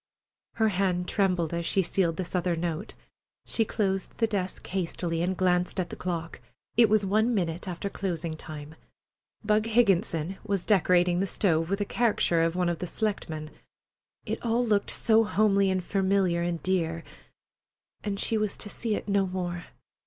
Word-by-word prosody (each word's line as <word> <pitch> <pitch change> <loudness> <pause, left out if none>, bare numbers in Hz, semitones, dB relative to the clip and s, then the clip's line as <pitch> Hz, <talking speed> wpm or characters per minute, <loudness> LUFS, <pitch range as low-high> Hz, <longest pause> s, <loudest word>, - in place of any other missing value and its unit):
Her 220 -1 +2
hand 180 -2 0
trembled 180 -5 +1
as 170 0 -1
she 190 +3 +2
sealed 170 -2 0
this 185 -2 -4
other 180 -1 +1
note. 165 -1 -4 0.5
She 225 - +1
closed 195 -3 -2
the 230 - +3
desk 195 -4 -3
hastily 170 -2 -2
and 180 +1 -1
glanced 180 +1 +1
at 180 - -2
the - - -5
clock. 170 -2 -4 0.4
It 230 -1 +6
was 210 -1 +3
one 220 +5 +2
minute 175 -2 -2
after 180 +2 -4
closing 170 -5 -3
time. 155 -1 -9 0.7
Bug 215 +1 +2
Higginson 195 -6 +2
was 200 -4 -2
decorating 180 -3 +3
the 195 - 0
stove 165 -5 +1
with 200 +1 -1
a - - +1
caricature 205 -7 +2
of 165 +1 +1
one 180 -1 +1
of 170 -1 -1
the 180 - -3
selectmen. 160 -8 -3 0.7
It - - -4
all 235 +1 +1
looked 210 -3 +1
so 225 0 +4
homely 200 -2 +3
and 185 -1 0
familiar 190 -2 +1
and 170 -1 -2
dear, 165 -3 0 1.0
and 200 -1 -3
she 220 +1 0
was 210 -1 0
to 205 - -5
see 225 -3 -1
it - - -5
no 200 -1 +2
more! 175 -1 -4
185 Hz, 170 wpm, -27 LUFS, 170-205 Hz, 1.0 s, It